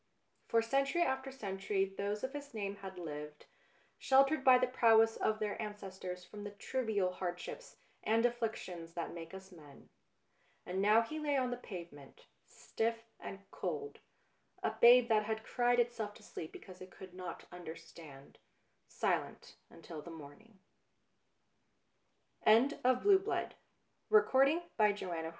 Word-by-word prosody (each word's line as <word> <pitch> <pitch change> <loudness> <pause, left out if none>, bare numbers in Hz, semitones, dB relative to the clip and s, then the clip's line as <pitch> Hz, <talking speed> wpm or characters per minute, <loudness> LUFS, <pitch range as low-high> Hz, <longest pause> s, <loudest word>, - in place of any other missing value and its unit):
For 230 0 +3
century 275 +8 +2
after 265 -2 -2
century 195 -5 -1
those 205 +1 -2
of 260 +2 -3
his 285 -3 -8
name 200 -1 -3
had 190 -1 -9
lived, 150 -3 -7 0.5
sheltered 275 +2 +4
by 255 -1 +8
the 255 - +3
prowess 225 -3 +4
of 215 - 0
their 215 +1 -3
ancestors 190 -4 -6
from 205 +2 -9
the 205 - -5
trivial 205 -2 -1
hardships 180 - -6 0.2
and 225 +2 +2
afflictions 220 -8 -3
that 170 -1 -4
make 165 -1 -8
us 190 0 -10
men. 150 -5 -15 0.8
And 185 +2 -2
now 215 +3 +5
he 310 +7 -5
lay 295 -2 +1
on 255 -2 0
the - - -1
pave 180 -8 -8
ment, 140 -2 -15 0.2
stiff 230 0 -3 0.2
and 195 0 -8
cold, 430 0 -4 0.6
a - - +1
babe 240 0 +7
that 215 -1 +3
had 220 0 -3
cried 245 +1 +2
itself 230 -3 -1
to - - -15
sleep 160 - -7
because 185 -1 -12
it 185 - -9
could 185 -1 -12
not 180 -2 -7
understand, 160 -4 -11 0.5
sile - - -1
210 Hz, 125 wpm, -35 LUFS, 180-245 Hz, 0.8 s, by